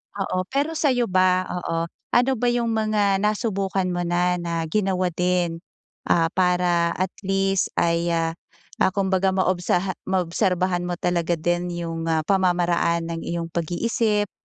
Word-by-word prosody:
Oo, 185 -2 -2
pero 285 +4 -1
sa'yo 245 - +1
ba? 185 0 +3 0.2
Oo. 165 -1 -3 0.2
Ano 250 +2 +4
ba 245 - +1
'yong 240 -1 +1
mga 210 -3 +1
nasubukan 200 -2 0
mo 175 - -2
na, 180 +1 +1
na 170 -1 -2
ginawa 185 -3 +1
din, 175 -1 0 0.5
ah, 165 -1 +3
para 180 -2 +2
at 185 +1 -1 0.2
least 195 0 +1
ay, 170 0 +1
ah, 165 0 0 0.5
ah, 190 - +3
kumbaga 190 -1 +1
maobsaha 185 0 +1 0.2
maobserbahan 180 -1 0
mo 175 - -2
talaga 175 -1 0
din 175 +2 -1
'yong, 165 -1 -4
ah, 160 -1 +1
pamamaraan 175 -2 +1
ng 165 - -3
iyong 170 -1 -3
pag-iisip 205 +5 0
180 Hz, 140 wpm, -23 LUFS, 170-195 Hz, 0.5 s, Ano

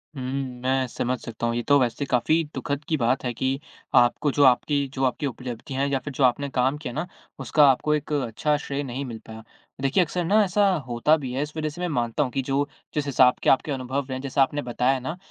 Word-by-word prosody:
हुँ। 135 - -6 0.4
मैं 130 0 +1
समझ 125 +1 -2
सकता 115 0 -4
हूँ, 115 - -1
ये 120 - 0
तो 145 - +6
वैसे 125 +2 0
काफ़ी 155 +6 +2
दुख़द 145 0 -3
की 160 - +2
बात 130 +1 +1
है 125 - -1
कि 130 +3 -1 0.4
आपको 120 +4 +4
जो 145 - +3
आपकी 140 +2 +3
जो 135 - -2
आपकी 130 +3 -1
उपलब्धियाँ 125 +1 -5
हैं 140 - 0
या 135 - +1
फिर 140 +2 -7
जो 135 - 0
आपने 135 +3 +2
काम 130 +2 +1
किया 150 -4 -6
है - - -10
ना, 155 +4 -2 0.3
उसका 135 +3 +4
आपको 145 +3 +2
एक 150 0 -4
अच्छा 145 +2 0
श्रेय 145 -1 -4
नहीं 135 +1 -4
मिल 115 -3 -7
पाया। 110 0 -9 0.4
देखिए, 140 +7 +3
अक़्सर 175 +2 -3
ना 210 +5 +4
ऐसा 200 +2 +2 0.2
होता 120 +6 +3
भी 135 -5 -5
है, 135 - -1
इस 150 +1 -8
वज़ह 155 -1 -1
से 165 +4 -9
मैं 180 - 0
मानता 120 -1 0
हूँ 130 - -4
कि 135 - -1
जो 140 +1 +1 0.3
जिस 150 -1 -1
हिसाब 130 -2 +4
के - - +3
आपके 135 +3 +3
अनुभव 130 +1 -3
है, 130 - -3
जैसा 140 0 0
आपने 145 +2 +1
बताया 125 +1 0
ना, 155 +7 -5
135 Hz, 245 wpm, -25 LUFS, 125-145 Hz, 0.4 s, तो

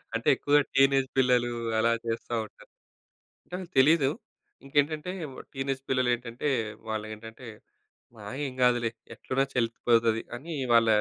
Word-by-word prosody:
అంటే, 115 - -3
ఎక్కువగా 145 +2 +3
టీనేజ్ 135 0 +4
పిల్లలూ 125 -2 +3 0.3
అలా 115 +1 +3
జేస్తా 115 +1 -3
ఉంటారు. - - -18 0.8
అంటే - - -1 0.2
తెలీదు. 140 +1 +5 0.6
ఇంకేంటంటే, 150 +4 0 0.2
వ్ - - -12 0.2
టీనేజ్ 135 0 -2
పిల్లలేంటంటే 125 +1 0 0.4
వాళ్ళేంటంటే 110 +2 -6 0.8
ఆహ్, 105 +6 -6
ఏం 130 - -4
గాదులే. 120 -2 +3 0.2
ఎట్లున్నా 135 +1 -1
చెల్లిపోతది 115 -1 +2
అని 160 +7 -7 0.2
వాళ్ళ 115 -1 +5
125 Hz, 115 wpm, -28 LUFS, 115-135 Hz, 0.8 s, తెలీదు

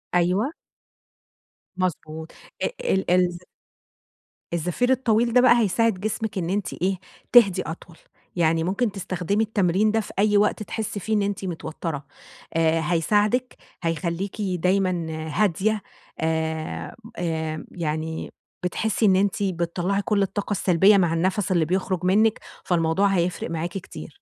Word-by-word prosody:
أيوه. 185 - +2 1.3
مضبوط. 160 -3 -3 0.3
آآ - - +3 0.3
ال 190 - +2
ال 180 -1 +3 1.2
الزفير 180 +10 0
الطويل 235 -2 +2
ده 250 - +6
بقى، 245 -1 +6
هيساعد 220 -1 +2
جسمِك 215 0 -3
إن 170 -1 -2
أنتِ 200 0 -1
إيه؟ 185 +2 -1 0.4
تهدي 215 -7 +6
أطول، 165 +1 -8 0.4
يعني 165 -1 +2
ممكن 200 +6 0
تستخدمي 195 +2 -1
التمرين 205 -1 +2
ده 225 - +2
في 215 - -6
أي 210 0 +4
وقت 210 +1 +2
تحسي 210 -1 -4
فيه 220 +3 -2
إن 210 - +3
أنتِ 200 -1 -2
متوترة، 160 -3 -5 0.5
آآ 165 0 +2
هيساعدِك، 210 +9 +1 0.3
هيخليكِ 170 +5 -2
دايمًا 185 -2 +1 0.2
هادية، 210 +2 +1 0.4
آآ، 160 0 -2 0.2
آآ، 160 -2 -2
يعني 160 -1 -3 0.3
بتحسي 220 +4 0
إن 190 -2 +5
أنتِ 200 +1 +1
بتطَّلعي 180 +2 -1
كل 200 0 +1
الطاقة 200 +1 -2
السلبية 190 +1 +4
مع 175 -4 +2
النَّفَس 185 +3 0
اللي 170 -3 +3
بيخرج 185 +1 -1
منِّك. 215 +4 +3 0.3
فالموضوع 170 +3 +2
هيفرِق 180 -3 0
معاكِ 165 +1 -2
كتير. 160 -4 -8
185 Hz, 130 wpm, -24 LUFS, 165-210 Hz, 1.3 s, ده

